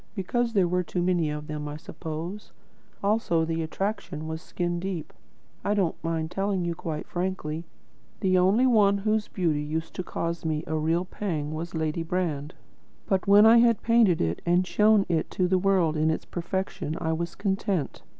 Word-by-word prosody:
Because 230 Hz, +5 st, -1 dB
there 195 Hz, -4 st, +3 dB
were 180 Hz, +1 st, +1 dB
too 180 Hz, 0 st, -3 dB
many, 175 Hz, -4 st, +1 dB
I 150 Hz, 0 st, -5 dB
suppose. 165 Hz, +4 st, -7 dB, 0.5 s
Also, 200 Hz, -6 st, +2 dB
the 165 Hz, 0 st, -2 dB
attraction 175 Hz, -1 st, -3 dB
was 160 Hz, 0 st, -4 dB
skin 175 Hz, -1 st, -2 dB
deep. 175 Hz, -4 st, -4 dB, 0.5 s
I 205 Hz, -, +1 dB
don't 185 Hz, -5 st, +1 dB
mind 165 Hz, -1 st, -2 dB
telling 195 Hz, -1 st, -1 dB
you 170 Hz, -, -1 dB
quite 160 Hz, -2 st, -5 dB
frankly: 175 Hz, -3 st, -3 dB, 0.5 s
the 185 Hz, -2 st, +2 dB
only 190 Hz, +7 st, +4 dB
one 210 Hz, -5 st, +4 dB
whose 215 Hz, +1 st, 0 dB
beauty 165 Hz, -6 st, 0 dB
used 160 Hz, +2 st, -4 dB
to 185 Hz, -, -4 dB
cause 170 Hz, -1 st, -3 dB
me 155 Hz, -1 st, -1 dB
a 160 Hz, -, -2 dB
real 165 Hz, +3 st, +1 dB
pang 160 Hz, -7 st, -3 dB
was 165 Hz, +2 st, -5 dB
Lady 160 Hz, 0 st, -1 dB
Brand. 165 Hz, -3 st, -2 dB, 0.5 s
But 190 Hz, -1 st, 0 dB
when 205 Hz, +2 st, +8 dB
I 230 Hz, +1 st, +8 dB
had 230 Hz, -2 st, +3 dB
painted 230 Hz, -7 st, +4 dB
it 85 Hz, +1 st, -1 dB
and 175 Hz, +1 st, +3 dB
shown 210 Hz, +1 st, +4 dB
it 165 Hz, -3 st, 0 dB
to 185 Hz, -, 0 dB
the 185 Hz, 0 st, +2 dB
world 180 Hz, -5 st, +2 dB
in 155 Hz, +1 st, +2 dB
its 160 Hz, -, -1 dB
perfection, 175 Hz, -3 st, -3 dB
I 160 Hz, -1 st, 0 dB
was 170 Hz, +1 st, -3 dB
content. 195 Hz, -, -1 dB
175 Hz, 175 wpm, -27 LUFS, 160-195 Hz, 0.5 s, when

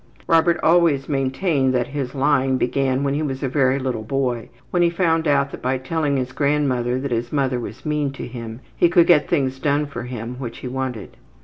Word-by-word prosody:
Robert 165 Hz, +1 st, +3 dB
always 165 Hz, -5 st, +3 dB
maintained 135 Hz, 0 st, 0 dB
that 125 Hz, +1 st, 0 dB
his 140 Hz, -2 st, -4 dB
lying 135 Hz, -1 st, +2 dB
began 130 Hz, +1 st, 0 dB
when 140 Hz, -1 st, 0 dB
he 145 Hz, -, -1 dB
was 135 Hz, -2 st, -3 dB
a -, -, +1 dB
very 130 Hz, 0 st, +2 dB
little 130 Hz, -4 st, -2 dB
boy, 125 Hz, 0 st, -2 dB, 0.2 s
when 175 Hz, -, +2 dB
he 170 Hz, -, +4 dB
found 165 Hz, -2 st, +1 dB
out 140 Hz, -1 st, +2 dB
that -, -, -8 dB
by 130 Hz, +1 st, 0 dB
telling 145 Hz, +2 st, -1 dB
his 130 Hz, -1 st, -2 dB
grandmother 130 Hz, -4 st, 0 dB
that 140 Hz, 0 st, -4 dB
his 120 Hz, 0 st, -2 dB
mother 135 Hz, -4 st, 0 dB
was 120 Hz, +2 st, -8 dB
mean 150 Hz, -2 st, 0 dB
to -, -, -6 dB
him 115 Hz, -1 st, -8 dB
he 175 Hz, -, +4 dB
could 170 Hz, 0 st, +5 dB
get 150 Hz, -5 st, +4 dB
things 135 Hz, -5 st, 0 dB
done 145 Hz, +1 st, +1 dB
for 140 Hz, -, -7 dB
him 125 Hz, 0 st, -6 dB
which 120 Hz, -3 st, -6 dB
he -, -, -7 dB
wanted. 125 Hz, -4 st, -5 dB
135 Hz, 210 wpm, -21 LUFS, 130-150 Hz, 0.2 s, could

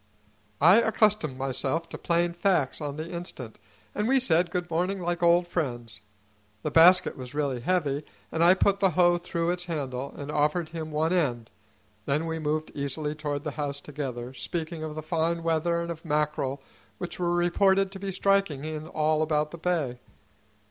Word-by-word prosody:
I 175 Hz, +8 st, +7 dB
accustomed 210 Hz, -, +2 dB
myself 135 Hz, +4 st, -2 dB
to -, -, -7 dB
plain 170 Hz, 0 st, +1 dB
facts 170 Hz, -6 st, +1 dB
on 145 Hz, -1 st, -3 dB
the 155 Hz, +1 st, -4 dB
instant, 170 Hz, -, -7 dB, 0.3 s
and 210 Hz, +1 st, -1 dB
we 265 Hz, +1 st, +4 dB
said 175 Hz, -8 st, +2 dB
good 180 Hz, -1 st, -2 dB
morning 180 Hz, +4 st, 0 dB
like 175 Hz, 0 st, -2 dB
old 170 Hz, +1 st, +4 dB
friends. 120 Hz, -10 st, -4 dB, 0.6 s
The -, -, -2 dB
basket 180 Hz, +3 st, +6 dB
was 130 Hz, +1 st, -9 dB
really 140 Hz, -4 st, -1 dB
heavy, 150 Hz, -2 st, 0 dB, 0.3 s
and 165 Hz, -, +1 dB
I 175 Hz, +2 st, +7 dB
put 200 Hz, +1 st, +2 dB
the 195 Hz, -1 st, +4 dB
hoe 175 Hz, -1 st, +5 dB
through 170 Hz, -1 st, -1 dB
its 180 Hz, 0 st, -3 dB
handle 140 Hz, -5 st, -4 dB
and 145 Hz, +1 st, -5 dB
offered 150 Hz, +3 st, +1 dB
him 160 Hz, -1 st, -5 dB
one 155 Hz, +3 st, 0 dB
end; 125 Hz, -10 st, 0 dB, 0.6 s
then 150 Hz, +4 st, +1 dB
we 160 Hz, 0 st, -3 dB
moved 155 Hz, 0 st, -2 dB
easily 145 Hz, +2 st, -3 dB
toward 145 Hz, -2 st, -4 dB
the 150 Hz, -, -3 dB
house 140 Hz, -1 st, -3 dB
together, 130 Hz, -4 st, -6 dB
speaking 160 Hz, +4 st, -4 dB
of 155 Hz, -1 st, -5 dB
the 155 Hz, -, -5 dB
fine 165 Hz, +1 st, 0 dB
weather 165 Hz, +1 st, +1 dB
and 170 Hz, 0 st, -3 dB
of 165 Hz, -1 st, -8 dB
mackerel 150 Hz, -3 st, -1 dB, 0.3 s
which 175 Hz, -, -6 dB
were 175 Hz, -1 st, +1 dB
reported 190 Hz, +2 st, +3 dB
to 195 Hz, -, -8 dB
be 195 Hz, 0 st, -4 dB
striking 195 Hz, -7 st, +1 dB
in 155 Hz, 0 st, -5 dB
all 155 Hz, 0 st, +1 dB
about 150 Hz, -1 st, 0 dB
the 170 Hz, -, -9 dB
bay. 160 Hz, -8 st, -1 dB
160 Hz, 180 wpm, -27 LUFS, 145-175 Hz, 0.6 s, I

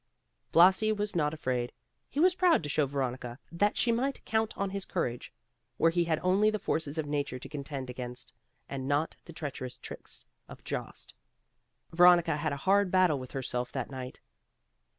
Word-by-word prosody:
Blasi 190 Hz, +6 st, +6 dB
was 210 Hz, -2 st, -2 dB
not 150 Hz, -3 st, +2 dB
afraid. 130 Hz, -6 st, -2 dB, 0.4 s
He 280 Hz, -, -4 dB
was 365 Hz, +3 st, +5 dB
proud 355 Hz, -, +3 dB
to 145 Hz, -, -4 dB
show 145 Hz, 0 st, +2 dB
Veronica 130 Hz, -3 st, -3 dB
that 205 Hz, +5 st, +1 dB
she 235 Hz, -, +3 dB
might 265 Hz, +4 st, -1 dB
count 220 Hz, 0 st, 0 dB
on 200 Hz, -1 st, -1 dB
his 200 Hz, 0 st, -3 dB
courage, 125 Hz, -11 st, -3 dB, 0.5 s
where 165 Hz, -, +4 dB
he 170 Hz, 0 st, +1 dB
had 160 Hz, -2 st, 0 dB
only 195 Hz, +4 st, +4 dB
the 215 Hz, -, 0 dB
forces 160 Hz, -6 st, -2 dB
of 160 Hz, -, -1 dB
nature 145 Hz, -3 st, -2 dB
to 125 Hz, -, -9 dB
contend 140 Hz, -3 st, -5 dB
against, 125 Hz, -1 st, -7 dB, 0.3 s
and 135 Hz, -1 st, -5 dB
not 145 Hz, +3 st, 0 dB
the -, -, -10 dB
treacherous 130 Hz, -5 st, -6 dB
tricks -, -, -8 dB, 0.2 s
of -, -, -12 dB
Jost. -, -, -5 dB, 0.8 s
Veronica 175 Hz, -2 st, +6 dB
had 155 Hz, 0 st, -1 dB
a 140 Hz, -, -2 dB
hard 200 Hz, 0 st, +4 dB
battle 180 Hz, -6 st, +3 dB
with 130 Hz, -1 st, -9 dB
herself 125 Hz, -2 st, -2 dB
that 130 Hz, -1 st, -3 dB
night. 130 Hz, -1 st, -7 dB
155 Hz, 175 wpm, -30 LUFS, 130-190 Hz, 0.8 s, Blasi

